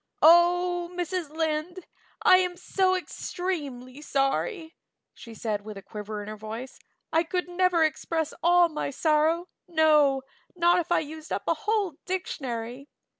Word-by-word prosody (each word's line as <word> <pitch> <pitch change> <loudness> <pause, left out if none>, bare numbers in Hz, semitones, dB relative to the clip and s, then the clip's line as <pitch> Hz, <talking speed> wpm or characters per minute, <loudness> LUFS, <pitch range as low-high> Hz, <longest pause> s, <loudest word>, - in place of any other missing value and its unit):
"Oh, 350 +1 +5
Mrs. 355 -2 -2
Lynde, 320 +3 -2 0.4
I 370 - +8
am 360 -1 0
so 370 +1 +1
extremely 295 -8 -5
sorry," 320 - -1 0.4
she 230 -1 -12
said 215 -2 -2
with 210 -1 -8
a 195 - -9
quiver 210 +1 -6
in - - -10
her 215 - -6
voice. 220 +4 -8 0.3
"I 325 - +5
could 360 +2 -2
never 355 -1 +2
express 320 0 -1
all 350 0 +5
my 305 -3 -3
sorrow, 315 +4 +1 0.2
no, 300 -5 +4 0.3
not 345 0 +4
if 345 - -4
I - - +4
used 315 +1 -9
up - - -2
a - - +4
whole 420 -7 -1
dictionary. 265 -8 -4
320 Hz, 145 wpm, -27 LUFS, 270-355 Hz, 0.4 s, I